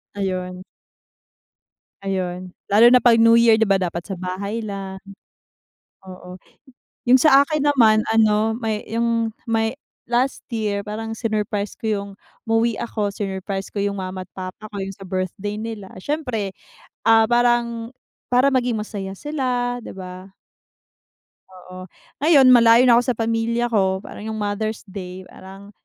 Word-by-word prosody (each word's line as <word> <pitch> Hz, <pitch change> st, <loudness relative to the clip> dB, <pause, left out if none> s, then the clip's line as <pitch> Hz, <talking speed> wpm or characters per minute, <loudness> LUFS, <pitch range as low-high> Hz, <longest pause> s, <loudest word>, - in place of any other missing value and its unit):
Ayun. 185 Hz, -2 st, -4 dB, 1.4 s
Ayun. 185 Hz, -1 st, -3 dB, 0.2 s
Lalo 210 Hz, +3 st, +6 dB
na 250 Hz, -, +6 dB
'pag 230 Hz, 0 st, +5 dB
New 230 Hz, 0 st, +6 dB
Year, 230 Hz, -1 st, +5 dB
di 225 Hz, -, +3 dB
ba 195 Hz, -1 st, +2 dB
dapat 170 Hz, -1 st, -3 dB
sa 200 Hz, -, -5 dB
bahay 200 Hz, +5 st, -4 dB
lang. 195 Hz, -2 st, -6 dB, 1.1 s
Oo. 180 Hz, 0 st, -11 dB, 0.7 s
Yung 255 Hz, -, +8 dB
sa 275 Hz, 0 st, +6 dB
akin 300 Hz, 0 st, -1 dB
naman 220 Hz, -5 st, +4 dB
ano, 220 Hz, 0 st, +3 dB
may 220 Hz, -2 st, -3 dB
yung 230 Hz, 0 st, 0 dB, 0.2 s
may 225 Hz, +1 st, 0 dB, 0.3 s
last 245 Hz, +3 st, 0 dB
year 210 Hz, -3 st, -2 dB
parang 225 Hz, +2 st, -5 dB
sinurprise 210 Hz, -2 st, -2 dB
ko -, -, -6 dB
yung 200 Hz, -2 st, -2 dB, 0.4 s
umuwi 225 Hz, 0 st, +1 dB
ako, 215 Hz, -3 st, -2 dB
sinurprise 195 Hz, -1 st, -5 dB
ko 205 Hz, -, -3 dB
yung 200 Hz, 0 st, -1 dB
mama 185 Hz, -1 st, -6 dB
at -, -, -72 dB
papa 185 Hz, +3 st, -7 dB
ko, 205 Hz, -, -10 dB
yung 195 Hz, 0 st, -5 dB
sa 195 Hz, -2 st, -11 dB
birthday 190 Hz, +2 st, -3 dB
nila. 215 Hz, -2 st, -6 dB
Siyempre, 230 Hz, -4 st, -3 dB, 0.5 s
ah, 225 Hz, -1 st, +5 dB
parang 240 Hz, -1 st, +1 dB, 0.4 s
para 250 Hz, +3 st, +5 dB
maging 250 Hz, -4 st, 0 dB
masaya 200 Hz, -2 st, -6 dB
sila, 245 Hz, 0 st, -2 dB
di -, -, -8 dB
ba? 185 Hz, 0 st, -10 dB, 1.1 s
Oo. 185 Hz, 0 st, -12 dB, 0.3 s
Ngayon, 285 Hz, -3 st, +5 dB
malayo 235 Hz, 0 st, +7 dB
na 240 Hz, -2 st, +6 dB
ako -, -, -1 dB
sa 250 Hz, -, +1 dB
pamilya 230 Hz, +1 st, -1 dB
ko, 190 Hz, -3 st, +1 dB
parang 215 Hz, -, -9 dB
yung 220 Hz, -, -4 dB
Mother's 210 Hz, +1 st, -3 dB
Day, 185 Hz, -2 st, -8 dB
parang, 195 Hz, +2 st, -13 dB
215 Hz, 145 wpm, -21 LUFS, 195-235 Hz, 1.4 s, Yung